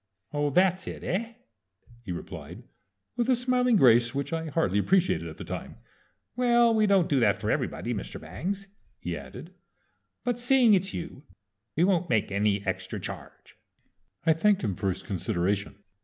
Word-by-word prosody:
"Oh, 145 0 +1
that's 185 +4 +2
it, - - -6
eh?" 225 +6 -2 0.7
he 105 -6 -7
replied, 85 - -8 0.5
with 240 +1 0
a 255 - +5
smiling 250 0 +2
grace 120 - +5
which 140 +4 -2
I 165 0 -2
hardly 105 - +1
appreciated 185 - +2
at - - -11
the - - -7
time. - - -6 0.6
"Well, 240 -2 +4
we 215 -1 +3
don't 195 -4 +4
do 140 - +2
that 105 -5 +4
for - - -2
everybody, - - -2
Mr. - - -6
Bangs," 180 - -4 0.3
he - - -4
added; - - -10 0.7
"but 245 -1 -1
seeing 245 -2 +5
it's 190 0 +2
you 165 -5 -6 0.5
we 165 - +3
won't 180 -2 +2
make 105 -3 +1
any 100 0 +1
extra - - -3
charge." - - -9 0.7
I 165 - +5
thanked 200 +5 +2
him 105 -4 0
for 95 +2 -2
his 95 - -4
consideration. 100 0 -1
170 Hz, 165 wpm, -27 LUFS, -, 0.7 s, a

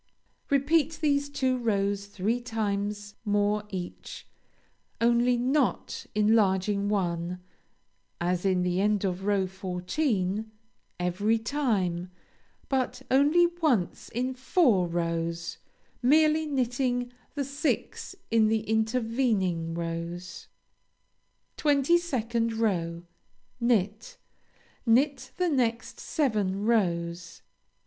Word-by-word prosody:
Repeat 300 +3 +2
these 285 -2 +1
two 260 -3 0
rows 200 -3 0
three 205 +5 -1
times 205 -3 -3
more 205 0 +1
each, 180 -3 -7 0.7
only 240 +1 +3
not 260 +2 0
enlarging 205 -2 +2
one 180 -3 -1 0.8
(as 175 0 0
in 185 -2 +2
the 180 +1 0
end 210 -1 +2
of 190 0 -2
row 200 -2 +2
fourteen), 190 - -2 0.5
every 195 +6 +1
time, 210 -9 -1 0.6
but 265 -1 -1
only 295 +6 +5 0.2
once 240 - +1
in 250 +3 -2
four 255 - +2
rows, 170 0 -2 0.4
merely 310 +4 +4
knitting 245 -2 -1 0.2
the 285 -2 -1
six 285 +6 -2 0.2
in 225 -1 +4
the 220 0 +1
intervening 220 -7 0
rows. 170 +1 -5 1.1
22nd 265 -7 +1
row 170 -6 -1 0.6
Knit. 220 -2 0 0.7
Knit 260 +2 +2
the 360 -1 +1
next 245 -5 -1
seven 210 - 0
rows. 175 -6 0
220 Hz, 95 wpm, -28 LUFS, 185-255 Hz, 1.1 s, only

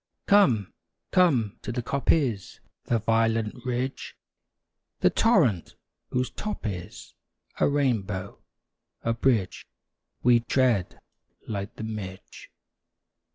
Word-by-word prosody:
Come, 125 - +4 0.4
come 135 - +3
to - - -5
the 120 0 -3
coppice, 135 - 0 0.3
The 120 - +1
violet 115 0 +1
ridge; 125 +1 -3 0.9
The - - +4
torrent, 150 - +2 0.3
whose 125 -2 -1
top 210 - -5
is 95 -1 -6 0.5
A - - +4
rainbow, 105 -9 -1 0.6
a 115 - +1
bridge 115 -5 0 0.6
We 120 -1 +6
tread 115 -5 +1 0.5
like 100 -2 -4
the - - -7
midge. 100 -4 -7
115 Hz, 100 wpm, -26 LUFS, 105-130 Hz, 0.9 s, We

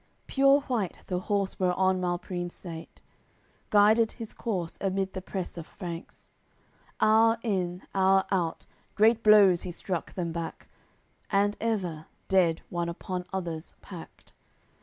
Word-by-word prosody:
AOI. - - -37
CCXLIII - - -40
Pure 275 +1 +5
white 240 -9 -2
the 180 -1 -2
horse 200 +1 -1
whereon 185 0 +2
Malprimes 175 0 -3
sate; 165 -3 -10 0.7
Guided 215 +2 +5
his 225 -3 -8
corse 185 -8 -3
amid 195 0 -1
the 185 - -4
press 185 -2 -5
of 165 - -8
Franks, 170 -4 -8 0.7
Hour 225 +1 +5
in, 185 -5 -1
hour 190 0 +4
out, 175 -4 -1 0.3
great 225 +2 +4
blows 205 -5 +6
he 180 - -5
struck 175 0 -4
them 170 -3 -2
back, 165 -1 -6 0.6
And, 205 +1 +2
ever, 185 -9 -2 0.2
dead 175 -4 +3
one 170 -1 -1
upon 180 +1 -5
others 170 -4 -5
packed. 175 -4 -12
190 Hz, 140 wpm, -28 LUFS, 175-205 Hz, 0.7 s, blows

